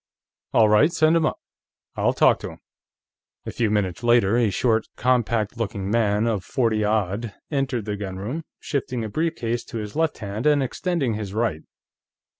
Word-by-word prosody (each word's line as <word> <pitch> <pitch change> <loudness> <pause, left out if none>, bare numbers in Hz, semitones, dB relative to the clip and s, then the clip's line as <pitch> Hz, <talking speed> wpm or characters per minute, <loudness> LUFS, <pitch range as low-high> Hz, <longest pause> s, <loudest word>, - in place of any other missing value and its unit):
All 110 - +5
right, 105 +10 +5
send 160 -1 +3
him 160 -2 +3
up. - - -2 0.6
I'll - - +1
talk - - +4
to - - -6
him." - - -11 0.9
A - - -4
few 115 -3 0
minutes 100 -4 -1
later, 120 -3 +4
a 120 -3 +3
short, 110 +3 +1
compact 120 -3 +1
looking 100 -3 -3
man 105 -1 +2
of 110 -5 0
forty 115 -4 0
odd 105 +1 -1 0.2
entered 135 -6 -1
the 105 -1 -2
gunroom, 100 - -4 0.2
shifting 130 -4 -3
a 110 - -4
brief 160 +8 -1
case 120 +1 -2
to 115 - -7
his 105 -2 -6
left 160 0 0
hand 105 +5 -3
and 145 -2 +4
extending 145 -2 -1
his 105 -2 -5
right. 110 -9 0
115 Hz, 175 wpm, -23 LUFS, 105-130 Hz, 0.9 s, All